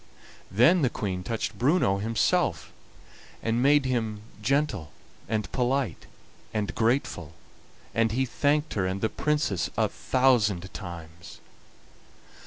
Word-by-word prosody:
Then 140 - +5
the 130 - +3
Queen 95 -5 -3
touched 115 +4 -3
Bruno 125 - +3
himself, 115 - 0 0.7
and 115 +1 +1
made 145 +1 +4
him 110 -5 -1 0.2
gentle 110 - 0 0.4
and 105 -4 -1
polite 125 - -1 0.4
and 105 -2 -2
grateful, 110 - 0 0.6
and 115 -1 +2
he 130 +4 +1
thanked 145 +4 +1
her 95 -3 0
and 95 +1 -3
the 110 - +1
Princess 145 - 0
a - - +3
thousand 105 -8 +1
times. 85 -3 -9
115 Hz, 115 wpm, -27 LUFS, 95-135 Hz, 0.7 s, Then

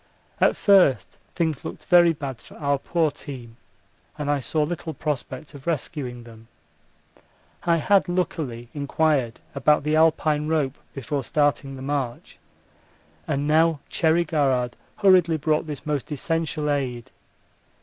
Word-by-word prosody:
At - - +4
first 135 - +3 0.2
things 160 -5 -1
looked - - -8
very 175 -2 +6
bad 140 -6 -6
for - - -15
our 140 -1 0
poor 165 0 0
team, 125 -5 -10 0.6
and 145 -1 -1
I 145 - +1
saw 150 +5 0
little 160 0 -4
prospect 145 0 -4
of 140 +1 -12
rescuing 130 -6 -3
them. 115 -1 -15 1.2
I 170 -1 +3
had 190 +4 +3
luckily 145 -10 -2
inquired 140 -4 0
about 145 +1 +3
the 150 +1 +1
Alpine 155 -1 +2
rope 150 -4 0 0.2
before 135 +1 -3
starting 145 -1 0
the 130 - -8
march, 135 -4 -4 0.9
and 140 +1 -1
now 160 0 +3
Cherry 165 +1 +2
Garrard 135 -6 0 0.2
hurriedly 180 -5 +4
brought 155 +1 0
this 145 -3 -6
most 150 -1 -2
essential 155 +1 -2
aid. 125 -5 -3
150 Hz, 135 wpm, -24 LUFS, 135-160 Hz, 1.2 s, very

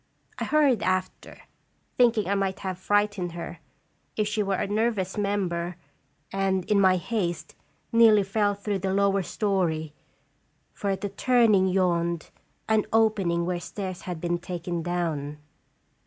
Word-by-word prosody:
I - - -1
hurried 285 -8 +3
after, 185 0 -2 0.5
thinking 235 -5 +3
I 200 - +1
might 195 -1 -1
have 185 -2 -4
fright 205 +2 +2
ened 175 -2 -3
her, 170 0 -7 0.6
if 215 -1 +1
she 210 +1 -1
were 195 -1 0
a - - -1
nervous 205 -2 0
member, 185 -4 -1 0.6
and, 190 -2 0
in 205 -1 +3
my 185 -1 +5
haste, 180 -3 -3 0.4
nearly 225 -3 +6
fell 205 +1 +1
through 200 0 -3
to 190 - -3
the 190 - 0
lower 200 0 +2
story, 170 -6 -1 0.8
for 200 - -3
at 195 -1 -1
the 205 - -2
turning 215 -3 +3
yawned 170 -3 0 0.4
an 220 -1 +2
opening 200 -6 +2
where 180 0 -1
stairs 185 0 -6
had 175 -3 -4
been 175 +1 -1
taken 175 -1 -4
down. 160 -4 -2
195 Hz, 150 wpm, -26 LUFS, 175-205 Hz, 0.8 s, nearly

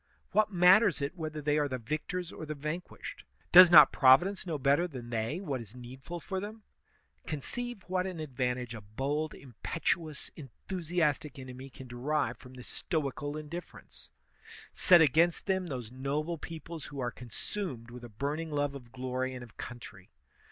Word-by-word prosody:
What 215 0 +3
matters 185 +2 +6
it 140 +3 -3
whether 155 -3 -5
they 150 +1 +2
are 145 - +2
the 130 -2 -3
victors 155 +8 -3
or - - -8
the 155 - -3
vanquished? 155 +5 -6 0.3
Does 180 0 +11
not 155 -3 +10
Providence 175 +9 +5
know 160 -3 -1
better 140 +6 +3
than 125 -7 -8
they 115 +8 -1
what 145 -10 -3
is 110 +1 -11
needful 130 +7 -8
for 190 +3 -4
them? 215 +2 -7 0.6
Conceive 240 - -4
what 185 0 0
an 180 -3 -5
advantage 125 -4 -2
a 110 - -7
bold, 140 +9 -2
impetu 155 +5 -2
ous, 150 - -10
enthusiastic 155 +1 -2
enemy 130 0 -9
can 130 0 -11
derive 125 0 -1
from 130 0 -13
this 125 - -10
stoical 145 -2 -3
in 155 -1 -7
diflference! 170 +3 -9 0.6
Set 175 -3 +6
against 160 +3 +4
them 190 -2 0
those 125 -7 -5
noble 145 +6 -2
peoples 165 -1 -7
who 140 -2 -8
are 120 -2 -1
consumed 125 - -5
with 125 0 -10
a 120 - -8
burning 145 +9 -3
love 145 -1 0
of 125 -4 -10
glory 130 0 -3
and 125 - -7
of 120 - -14
coun 120 - -6
try. 120 - -12
150 Hz, 175 wpm, -31 LUFS, 130-170 Hz, 0.6 s, Does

